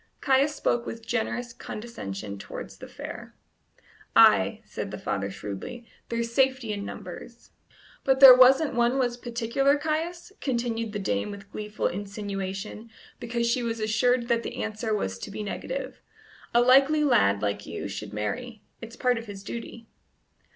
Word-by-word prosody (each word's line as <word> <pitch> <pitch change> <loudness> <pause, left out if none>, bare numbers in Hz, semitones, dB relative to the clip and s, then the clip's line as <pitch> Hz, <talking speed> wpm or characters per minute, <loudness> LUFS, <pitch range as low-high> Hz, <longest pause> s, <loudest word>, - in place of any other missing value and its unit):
Caius 275 +2 +3
spoke 240 0 0
with 225 0 -7
generous 240 +1 -2
condescension 105 - -7
towards - - -8
the - - -9
fair. - - -9 0.8
"Ay," - - +6
said - - -5
the - - -6
father 100 0 -2
shrewdly, 105 - -7 0.2
"there's 235 0 -2
safety 260 -4 +2
in 200 -1 -4
numbers." - - -9 0.5
"But 265 -1 +3
there 265 -2 +12
wasn't 265 +4 +6
one 240 +2 +2
was 245 -2 +1
particular, 240 +4 +1
Caius?" 320 +5 -3
continued 235 -4 -2
the - - -2
dame 105 - -1
with 200 0 -10
gleeful 210 0 -4
insinuation, 200 +2 -4 0.3
because 235 -1 -2
she 235 +2 +1
was 230 -1 -2
assured 235 +3 +2
that 235 -1 +2
the - - -4
answer 220 +1 -3
was 95 - -1
to - - -6
be 215 - -5
negative. - - -5 0.5
"A 240 - +5
likely 275 +5 +5
lad 100 - +3
like 100 0 -2
you - - -5
should 100 +1 -6
marry; 215 - -4 0.2
it's 230 0 -9
part 250 -2 +1
of 230 - -10
his 200 -1 -8
duty." 230 +1 -7
235 Hz, 155 wpm, -27 LUFS, 205-250 Hz, 0.8 s, there